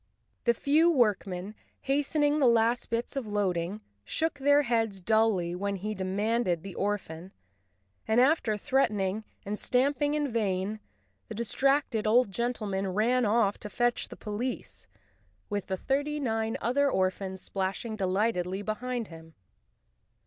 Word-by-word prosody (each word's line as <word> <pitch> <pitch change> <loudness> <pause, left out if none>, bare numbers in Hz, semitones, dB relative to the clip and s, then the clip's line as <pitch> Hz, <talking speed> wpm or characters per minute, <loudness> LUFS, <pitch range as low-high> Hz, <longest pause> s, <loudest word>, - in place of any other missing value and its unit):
The 235 -1 +4
few 305 +7 +3
workmen, 210 - +1 0.3
hastening 290 +2 +1
the 270 - +5
last 235 +1 +2
bits 230 +3 -2
of 270 -5 -3
loading, 195 -1 -1 0.2
shook 315 - -2
their 285 +1 +4
heads 225 -5 0
dully 210 -3 +2
when 200 +2 -2
he 210 +3 -4
demanded 195 -1 0
the 195 - -7
orphan 190 -3 -3 0.8
and, 220 +2 +3
after 255 -5 +3
threatening 215 -5 0 0.2
and 210 +1 -3
stamping 285 +3 +1
in 295 -1 0
vain, 205 -1 -1 0.5
the - - -7
distracted 235 0 +1
old 230 -1 +4
gentleman 210 -4 -2
ran 230 +6 +2
off 210 -2 +2
to 210 - -7
fetch 240 +3 0
the - - -10
police, 230 +4 -5 0.6
with 205 -2 -2
the 190 - -2
thirty 285 +6 -1
nine 225 -4 -1
other 280 +5 +2
orphans 190 -2 -1
splashing 195 +4 -3
delightedly 190 -1 0
behind 235 +2 -3
him. 160 -1 -13
220 Hz, 135 wpm, -29 LUFS, 195-250 Hz, 0.8 s, the